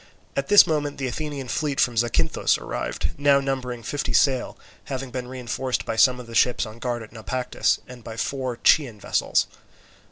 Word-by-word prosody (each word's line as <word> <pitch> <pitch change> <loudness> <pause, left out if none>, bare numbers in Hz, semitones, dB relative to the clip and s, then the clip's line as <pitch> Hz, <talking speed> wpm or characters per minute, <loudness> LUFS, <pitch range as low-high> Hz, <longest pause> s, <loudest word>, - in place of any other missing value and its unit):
At 140 - -1
this 205 0 +8
moment 145 -2 -1
the 135 - -3
Athenian 140 +1 -4
fleet 145 +2 -1
from 120 - +2
Zacynthus 120 +1 +1
arrived, - - -3
now 140 -1 +5
numbering 130 -3 -3
fifty 145 +6 -3
sail, 130 -3 +2 0.3
having 130 -1 -5
been 125 -1 -4
reinforced 130 0 -3
by 115 - -2
some 125 +2 +4
of 125 - -8
the 115 - -11
ships 125 +1 +3
on 110 +1 -10
guard 120 -1 -3
at 110 - -13
Naupactus 125 +3 -1
and 125 -2 -12
by 110 0 -8
four 130 -1 -2
Chian 125 -9 +4
vessels. - - +1
125 Hz, 180 wpm, -24 LUFS, 120-140 Hz, 0.3 s, this